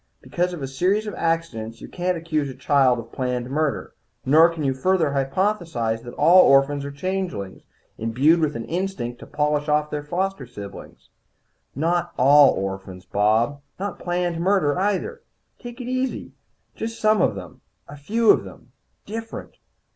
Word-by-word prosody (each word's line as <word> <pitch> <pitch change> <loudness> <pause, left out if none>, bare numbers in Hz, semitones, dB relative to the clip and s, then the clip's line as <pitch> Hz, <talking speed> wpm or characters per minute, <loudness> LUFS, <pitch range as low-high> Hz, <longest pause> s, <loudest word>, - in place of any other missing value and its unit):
Because 180 +1 -2
of 170 -6 -6
a - - -2
series 185 +11 0
of 210 - -5
accidents 130 -10 -2
you - - -9
can't 180 0 -2
accuse 155 -4 -2
a 130 - -8
child 135 -2 +3
of 115 0 -8
planned 125 -1 -3
murder. 150 0 -1 0.3
Nor 160 +5 +6
can 165 -2 -5
you 135 -1 +1
further 165 +2 +1
hypothesize 140 - -1
that 120 0 -10
all 180 +2 +7
orphans 140 +1 +4
are 140 - -5
changelings, 175 - -4 0.4
imbued 130 +9 +3
with 155 -2 0
an 115 - -4
instinct 165 -10 -3
to - - -11
polish 150 0 0
off 150 0 +1
their 150 - -2
foster 175 -1 -3
siblings." 100 -4 -11 0.6
"Not 170 +4 0
all 140 +2 +7
orphans, 95 -1 -5
Bob. 110 +9 +1 0.2
Not 200 -1 -4
planned 175 -1 -2
murder, 180 -4 +2
either. 210 - -1 0.4
Take 240 0 -9
it 245 - -6
easy. 255 +1 -2 0.4
Just 225 +1 -5
some 215 -3 +3
of - - +2
them. - - -10 0.3
A 145 - -10
few 215 +10 +3
of - - +2
them - - -13 0.3
different. 225 +2 -7
150 Hz, 160 wpm, -23 LUFS, 130-185 Hz, 0.6 s, all